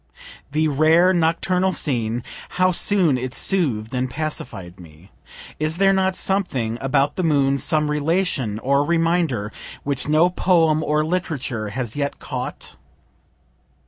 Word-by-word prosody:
The 155 +1 +1
rare 160 +5 +4
nocturnal 180 +2 +1
scene, 120 -6 -1 0.3
how 185 0 +4
soon 175 -7 +2
it 130 +1 -4
sooth'd 130 - 0
and 130 0 -1
pacified 120 - -6
me! 85 +2 -16 0.5
Is 155 +2 -1
there 195 0 +4
not 190 -1 +1
something 130 - -1
about 135 +1 +1
the 185 - 0
moon, 140 -4 +2
some 150 +2 +1
relation 150 - 0
or 140 +5 +1
reminder, 165 -9 0 0.3
which 140 -2 -3
no 155 +4 +3
poem 165 -4 +2
or 150 0 +1
literature 140 - -3
has 120 0 -4
yet 140 -1 -2
caught? - - -6
150 Hz, 130 wpm, -21 LUFS, 125-170 Hz, 0.5 s, rare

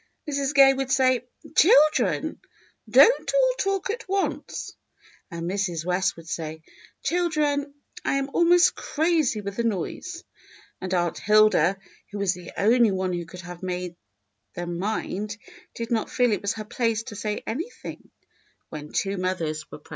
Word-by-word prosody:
Mrs. 280 -1 -1
Gay 270 -1 +8
would 270 -1 -3
say, 255 -2 +2 0.3
"Children, 310 -2 +4 0.5
don't - - +6
all - - +4
talk 390 0 0
at 455 -3 -7
once." 390 0 -2 0.5
And 170 0 -5
Mrs. 180 -4 -2
West 180 +1 +1
would 165 -1 -12
say, 160 -1 -5 0.4
"Children, 300 -5 0 0.3
I - - 0
am 275 0 -1
almost 345 +1 +5
crazy 310 -8 0
with 200 -1 -6
the 235 - 0
noise." 230 - -3 0.6
And 185 - -4
Aunt 175 -2 0
Hilda, 210 -4 +4 0.3
who 205 - -5
was 200 -2 +1
the 180 -2 -10
only 230 +4 +4
one 185 -1 -1
who 175 -1 -4
could 180 +1 -10
have 175 0 -10
made 180 -1 -4 0.6
them 175 0 -4
mind, 205 0 -3 0.4
did 230 0 -5
not 225 -2 0
feel 245 -2 +2
it 205 - 0
was 200 - -1
her 215 -1 -7
place 225 0 -1
to 225 -3 -9
say 210 0 -3
anything 325 - -6 0.6
when 150 -1 -8
two 195 0 -1
mothers 165 -5 -2
were - - -9
present. 150 - -22
215 Hz, 155 wpm, -25 LUFS, 180-280 Hz, 0.6 s, Gay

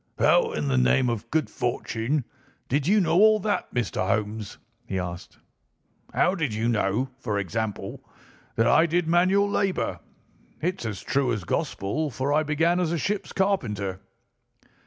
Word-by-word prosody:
"How, - - +4
in 75 -1 -2
the 65 -2 +2
name 120 - +3
of 115 0 -5
good 155 0 +1
fortune, 120 +3 -2 0.4
did 140 +3 0
you 210 +3 +5
know 170 -2 +3
all 215 +1 +6
that, 205 +1 -1
Mr. 120 -6 -1
Holmes?" 105 0 -2 0.3
he 95 - -2
asked. 90 -1 -6 0.7
"How 180 - +2
did 150 - -2
you 110 +2 0
know, 115 +2 +1
for 110 -5 -2
example, 105 +2 -3 0.5
that 115 - +3
I 140 +8 +5
did 170 0 0
manual 185 +4 +3
labour. 195 -2 -1 0.6
It's 180 -7 -2
as 105 -3 -5
true 135 -2 +1
as 105 -5 -2
gospel, 100 - -2
for 135 +3 -1
I 155 - +4
began 160 +4 +1
as 175 -3 0
a 170 - 0
ship's 200 +6 -2
carpenter." 105 - -1
130 Hz, 155 wpm, -25 LUFS, 105-170 Hz, 0.7 s, all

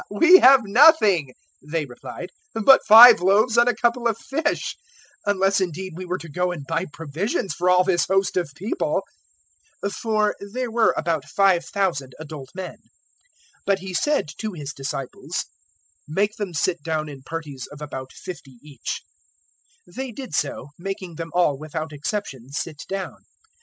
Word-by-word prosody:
"We 335 - +7
have 265 0 +7
nothing," 205 - +5 0.3
they 150 +2 -3
replied, 120 -3 -9 0.2
"but 245 +5 +6
five 225 +3 +10
loaves 210 +6 +3
and 235 +1 +5
a - - 0
couple 240 0 +1
of 225 -2 -1
fish, 295 +6 -2 0.5
unless 195 0 +2
indeed 185 +1 -4
we 185 +2 -7
were 180 +1 -2
to 170 - -10
go 180 +4 -1
and 155 -6 -7
buy 165 +4 -2
provisions 165 - -3
for 180 +1 0
all 180 0 +5
this 185 -2 +1
host 195 -1 +1
of 175 -5 -1
people." 210 - -2 0.8
009:014 200 - -2
(For 215 -1 0 0.2
there 250 -1 -3
were 230 0 +3
about 160 -3 -1
5,000 180 -6 +1
adult 150 -4 -9
men.) 190 -1 -6 0.9
But 200 -1 +3
He 190 0 -8
said 295 - +1
to 215 -1 -4
His 150 -3 -7
disciples, 135 -2 -5 0.6
"Make 200 +7 0
them 195 -5 -5
sit 170 +2 0
down 155 -1 -2
in 140 -3 -10
parties 145 -3 -7
of 145 - -11
about 130 -3 -7
fifty 135 -8 -10
each." 145 -5 -6 0.8
009:015 175 - -19
They 265 -1 -4
did 255 - -9
so, 145 -1 -2
making 190 -1 -6
them 165 0 -5
all, 150 -6 +2
without 155 0 -5
exception, 145 - -5
sit 150 +1 -5
down. 195 -1 -4
180 Hz, 160 wpm, -23 LUFS, 150-210 Hz, 0.9 s, five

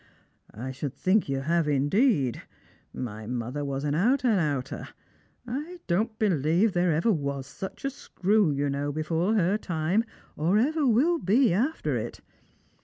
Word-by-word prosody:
" - - -44
I 125 +5 -6
should 135 +1 -5
think 190 +3 +2
yoii 135 -1 -2
have 165 +1 +1
indeed; 145 - +2 0.5
my 110 -3 -6
mother 125 +4 -3
was 140 -1 -3
an 145 -1 0
out 245 - +2
and 220 -5 +3
outer. 140 -5 -2 0.6
I 295 +9 -5
don't 215 +5 0
believe 180 +1 +2
there 175 0 +2
was - - -12
ever 140 - 0
such 190 - -8
a 275 - 0
screw, 205 - +1
you 145 0 0
know, 140 +1 -1
before 165 +7 0
her 200 +1 +2
time, 175 +4 0 0.3
or 170 +7 +2
ever 290 +5 +2
will 295 +9 +3
be 220 - +3
after 265 - 0
it. - - -5
175 Hz, 160 wpm, -27 LUFS, 140-220 Hz, 0.6 s, and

